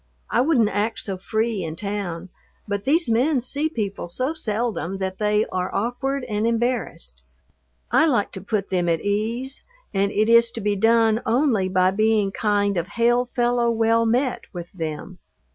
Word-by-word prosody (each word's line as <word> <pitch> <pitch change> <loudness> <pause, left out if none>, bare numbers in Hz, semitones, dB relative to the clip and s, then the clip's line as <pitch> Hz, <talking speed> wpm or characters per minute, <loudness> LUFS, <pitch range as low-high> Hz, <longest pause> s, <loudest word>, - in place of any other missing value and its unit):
I 240 - +3
wouldn't 255 -7 +3
act 210 +3 -1
so 195 - -3
free 220 +2 -1
in 160 -1 -5
town, 190 -2 -4 0.4
but 200 0 -3
these 325 +5 +3
men 255 +5 +2
see 285 +5 -2
people 205 - -4
so 255 - -2
seldom 220 - -2
that 190 -1 -4
they 210 0 +2
are 180 0 -1
awkward 250 +6 -1
and 215 -1 -1
embarrassed. 240 +2 -2 0.7
I 320 - +5
like 240 -9 +1
to 190 - -6
put 200 0 -2
them 175 -2 +1
at 165 -1 +1
ease, 230 +6 -2 0.3
and 200 0 +1
it 215 +1 +1
is 235 0 +6
to - - -3
be 205 0 0
done 225 +2 +3
only 230 -5 +2
by 185 0 +3
being 215 0 +2
kind 205 -2 0
of 170 0 -1
hail 240 +1 +3
fellow 240 -1 +1
well 230 0 +2
met 245 +2 0
with 175 -1 -8
them. 165 +1 -6
220 Hz, 170 wpm, -23 LUFS, 195-240 Hz, 0.7 s, is